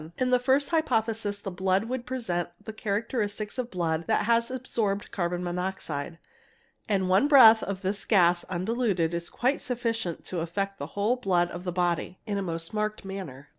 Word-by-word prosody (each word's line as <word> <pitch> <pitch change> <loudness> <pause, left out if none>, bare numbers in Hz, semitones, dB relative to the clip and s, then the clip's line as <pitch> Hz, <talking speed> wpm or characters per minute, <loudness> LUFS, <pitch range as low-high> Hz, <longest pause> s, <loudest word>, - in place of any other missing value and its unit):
In 255 0 +1
the 250 - +5
first 265 +3 +2
hypothesis 225 -10 0
the 200 -1 -6
blood 190 +2 +1
would 245 +1 -4
present 185 -10 -2 0.2
the 220 - -6
characteristics 215 +1 -2
of 245 -1 -2
blood 165 -4 -1
that - - +2
has 235 +1 +2
absorbed 225 -6 -2
carbon 175 -1 -2
monoxide, 175 -4 -3 0.7
and 190 -3 +1
one 190 +10 +4
breath 230 -6 +8
of 195 -1 -4
this 200 +2 -1
gas 175 -4 +4
undiluted 185 -2 0
is 170 0 -3
quite 260 +4 0
sufficient 230 -8 -3
to 180 - -3
affect 195 +4 -3
the 140 - -4
whole 215 +5 +2
blood 180 -7 +1
of 175 +1 -7
the 180 - -1
body 175 0 -1
in 205 -3 -1
a - - -2
most 165 -1 -3
marked 215 -1 -2
manner. 180 -9 -7
200 Hz, 175 wpm, -27 LUFS, 175-230 Hz, 0.7 s, breath